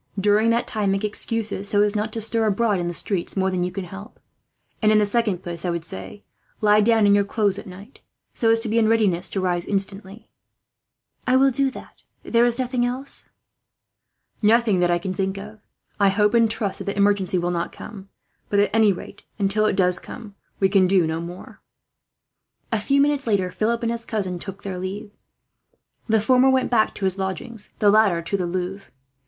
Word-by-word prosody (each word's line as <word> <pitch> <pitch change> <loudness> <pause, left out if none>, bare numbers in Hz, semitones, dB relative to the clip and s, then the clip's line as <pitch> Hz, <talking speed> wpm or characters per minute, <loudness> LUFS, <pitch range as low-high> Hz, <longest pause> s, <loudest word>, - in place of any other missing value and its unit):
During 210 +3 +3
that 235 +1 +1
time, 210 -3 -1
make 195 +1 0
excuses 210 -1 -2
so 205 -1 +3
as 210 0 0
not 215 +1 -1
to 225 - -4
stir 225 0 +1
abroad 210 -1 +1
in 175 - -2
the 175 - -3
streets 195 0 -2
more 190 0 +1
than 180 -1 -1
you 180 - -2
can 190 +1 -5
help; 195 +4 -11 0.6
and 215 -1 +4
in 215 - +5
the 210 - +3
second 205 -4 -1
place 170 -1 -6
I 180 - -1
would 170 -1 -3
say, 95 -5 -4 0.4
lie 210 0 +4
down 225 0 +3
in 200 - +5
your 205 0 +4
clothes 200 -1 0
at - - -11
night, 195 +7 -13 0.3
so 225 - +1
as 225 0 +4
to 230 - -2
be 225 +2 +1
in 220 - +3
readiness 200 -6 +2
to 195 - -3
rise, 175 -2 -1
instantly." 195 +2 -4 1.0
"I 255 - +3
will 270 +1 +4
do 275 +2 +1
that," - - -12
she - - -30 0.2
said. - - -11
"There 235 +1 +5
is 240 -1 0
nothing 250 -1 -1
else?" 255 +3 -2 1.1
"Nothing 220 -2 +3
that 175 0 +2
I 175 - +2
can 185 +2 -4
think 190 +1 -2
of. 210 +2 -10 0.4
I 200 -1 +5
hope 210 +1 +2
and 230 -1 +4
trust 210 -3 -2
that - - -6
the 200 - -4
emergency 200 -2 +2
will 175 0 -1
not 170 -1 -2
come; 195 -2 -11 0.4
but 205 - 0
at 205 0 +3
any 220 -2 +4
rate, 185 - -8 0.2
until 210 +1 +1
it - - 0
does 180 -2 +3
come, 215 -4 -10 0.3
we 195 - +4
can 190 -1 +3
do 185 -2 +3
no 160 +1 -2
more." 175 +2 -10 1.1
A 225 -2 0
few 275 +5 +2
minutes 285 -2 +1
later, 190 -4 +1
Philip 230 +4 -1
and 230 - 0
his 230 0 -4
cousin 190 -5 -3
took 195 +1 -9
their 190 -2 -5
leave. 195 +3 -6 1.0
The 220 0 +4
former 255 +4 +4
went 260 -1 +1
back 220 -3 +2
to 195 - -3
his 190 +1 -1
lodgings, 195 +3 -5
the 205 -1 +4
latter 205 -6 +3
to 170 - -2
the 180 -3 -1
Louvre. 185 +2 -5
205 Hz, 215 wpm, -22 LUFS, 190-225 Hz, 1.1 s, in